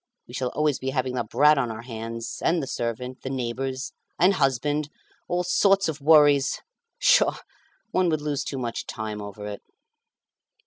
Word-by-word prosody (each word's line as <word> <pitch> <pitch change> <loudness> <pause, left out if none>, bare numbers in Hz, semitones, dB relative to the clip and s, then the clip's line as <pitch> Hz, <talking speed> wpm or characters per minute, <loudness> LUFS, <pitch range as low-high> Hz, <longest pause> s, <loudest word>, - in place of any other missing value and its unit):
We 120 - -13
shall 130 0 -1
always 150 -2 +1
be 130 - -3
having 130 -1 -1
the 125 - -1
brat 150 0 +4
on 125 -3 0
our 110 +1 -6
hands, 115 -1 -6
and 170 +1 +2
the 145 - -3
servant, 125 0 -4
the 130 - -5
neighbours, 130 +1 -3 0.3
and 185 +3 +5
husband, 145 0 0 0.4
all 180 0 0
sorts 195 +2 +3
of 155 -2 -4
worries. 145 -2 +5 0.4
Pshaw! - - +4 0.5
one 185 -3 +2
would 155 -2 0
lose 145 -2 -2
too 135 - -5
much 120 -3 -4
time 110 -2 -5
over 105 0 -8
it." 105 -1 -6
135 Hz, 170 wpm, -25 LUFS, 120-150 Hz, 0.5 s, and